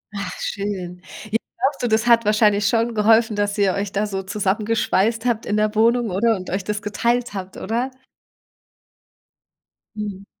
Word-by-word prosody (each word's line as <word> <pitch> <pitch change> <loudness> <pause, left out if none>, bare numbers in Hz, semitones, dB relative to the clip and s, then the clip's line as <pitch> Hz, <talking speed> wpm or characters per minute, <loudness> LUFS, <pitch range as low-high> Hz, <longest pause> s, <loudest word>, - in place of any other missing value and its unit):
Ach, 200 -2 -4
schön. 185 -3 -4 0.2
J 215 +1 0 0.2
glaubst 270 +2 0
du, 245 - +2
das 220 +1 +1
hat 230 -1 +6
wahrscheinlich 210 -1 +3
schon 230 +1 +1
geholfen, 220 +1 +4
dass 205 0 -1
ihr 200 -2 +3
euch 200 0 -3
da 205 +2 0
so 195 -1 -4
zusammengeschweißt 210 +2 0
habt 235 -2 0
in 210 - 0
der 215 0 +1
Wohnung, 230 +1 +3
oder? 225 +5 +2
Und 185 -2 -7
euch 190 +2 -2
das 210 +1 -3
geteilt 235 +3 -1
habt, 190 -2 -6
oder? 240 +5 -2 2.0
Mhm. 205 -2 -5
210 Hz, 160 wpm, -21 LUFS, 200-230 Hz, 2.0 s, hat